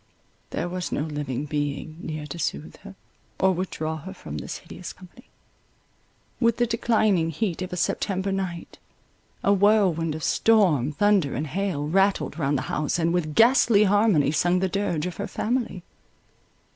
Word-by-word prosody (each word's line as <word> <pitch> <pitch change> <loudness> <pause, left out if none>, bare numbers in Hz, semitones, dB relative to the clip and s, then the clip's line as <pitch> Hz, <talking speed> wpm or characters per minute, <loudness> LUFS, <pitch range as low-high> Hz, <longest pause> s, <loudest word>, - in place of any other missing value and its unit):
There - - -3
was 180 0 -4
no - - -1
living 145 -3 -3
being 145 +1 -3
near 155 -1 -5
to 170 +3 -7
soothe 155 0 -4
her, 200 0 -12 0.4
or 190 - +4
withdraw 160 -3 -3
her 190 +5 -9
from 75 - -7
this - - -6
hideous 180 - -9
company. 185 +6 -16 1.1
With 230 -2 +2
the 240 - +3
declining 215 -7 +2
heat 175 +2 -2
of 185 - -4
a 180 - -4
September 190 +2 -1
night, 185 -3 -4 0.6
a 200 - +4
whirlwind 190 -6 +3
of 155 - -7
storm, 180 - +3
thunder, 195 -3 +2
and 145 +6 -2
hail, 160 -2 -2
rattled 195 +1 +1
round 145 -1 +1
the 130 - -3
house, 150 +1 0
and 170 0 +1
with 155 -4 -1
ghastly 230 -3 +5
harmony 205 -8 +3
sung 175 +4 +2
the 190 +1 +1
dirge 180 -5 -1
of 180 - -5
her 205 - -3
family. 225 -7 -2
180 Hz, 160 wpm, -25 LUFS, 155-200 Hz, 1.1 s, ghastly